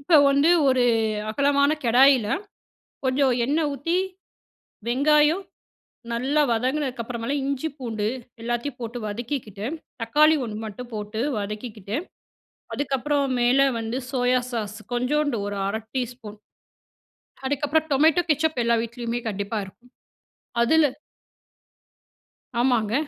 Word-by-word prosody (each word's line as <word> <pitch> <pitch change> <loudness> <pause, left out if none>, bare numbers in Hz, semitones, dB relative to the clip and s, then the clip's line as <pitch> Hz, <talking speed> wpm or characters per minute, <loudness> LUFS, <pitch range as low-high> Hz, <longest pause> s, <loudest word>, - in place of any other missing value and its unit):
இப்போ 310 +4 +4
வந்து 280 +4 +4 0.2
ஒரு 255 -1 +3 0.5
அகலமான 280 +4 +3
கடாயில, 250 0 +5 0.8
கொஞ்சம் 260 0 +2
எண்ணெய் 300 +3 +1
ஊத்தி, 330 +6 -1 0.9
வெங்காயம் 300 +7 +4 0.7
நல்லா 265 +6 +1
வதங்குனதுக்கு 255 +2 0
அப்புறமால, 235 +3 -3
இஞ்சி 280 +3 -1
பூண்டு 220 -5 -2 0.3
எல்லாத்தையும் 240 +3 -3
போட்டு 230 +1 -5
வதக்கிக்கிட்டு, 220 -2 -4 0.4
தக்காளி 300 +7 +4
ஒண்ணு 215 -3 -5
மட்டும் 240 +4 -8
போட்டு 210 +1 -4 0.2
வதக்கிக்கிட்டு, 210 0 -5 0.8
அதுக்கப்புறம் 280 -1 0
மேல 245 +3 +4 0.2
வந்து 225 +2 -3
சோயா 250 -1 +2
சாஸ் 215 -2 -3 0.2
கொஞ்சோண்டு, 285 +3 +1
ஒரு 205 0 -4
1/2 220 +2 -2
டீஸ்பூன், 240 -4 -4 1.1
அதுக்கப்புறம் 290 +3 0
டொமேட்டோ 315 +5 +4
கெட்சப் 305 -2 +1
எல்லா 235 0 +3
வீட்லயுமே 235 0 -4
கண்டிப்பா 205 +1 -3
இருக்கும். 245 +6 -17 0.7
அதில 310 +5 +5 1.7
ஆமாங்க. 235 -4 +2
250 Hz, 105 wpm, -24 LUFS, 230-285 Hz, 1.7 s, கடாயில